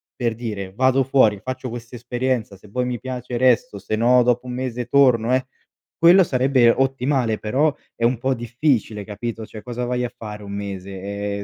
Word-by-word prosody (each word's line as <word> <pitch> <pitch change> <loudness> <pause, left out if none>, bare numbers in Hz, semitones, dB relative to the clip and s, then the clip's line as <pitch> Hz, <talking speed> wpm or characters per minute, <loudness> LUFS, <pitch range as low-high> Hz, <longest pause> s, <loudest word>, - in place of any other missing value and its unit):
per 120 -2 -1
dire, 105 -5 -5
vado 130 +4 +3
fuori, 115 -6 +3
faccio 130 0 -4
quest'esperienza, 120 -1 -3
se 100 +2 -17
poi 125 +3 -1
mi 125 -1 -2
piace 125 0 -6
resto, 130 +3 +2
se 100 +2 -3
no, 125 +2 +5
dopo 125 +1 +1
1 125 - -5
mese 125 -1 -3
torno 125 -3 +4
eh 130 - -1 0.5
quello 175 +3 +7
sarebbe 130 -4 +3
ottimale 130 -2 +1
però, 140 +8 +1 0.2
è - - -5
un 120 0 +2
po' 130 +2 0
difficile, 120 -3 -1
capito, 110 +2 -6
cioè 110 - -10
cosa 125 0 -4
vai 125 0 -1
a 120 - -5
fare 105 -1 -8
1 100 - -8
mese? 100 -1 -5
Ehm, 100 +1 -4
120 Hz, 185 wpm, -22 LUFS, 110-130 Hz, 0.5 s, quello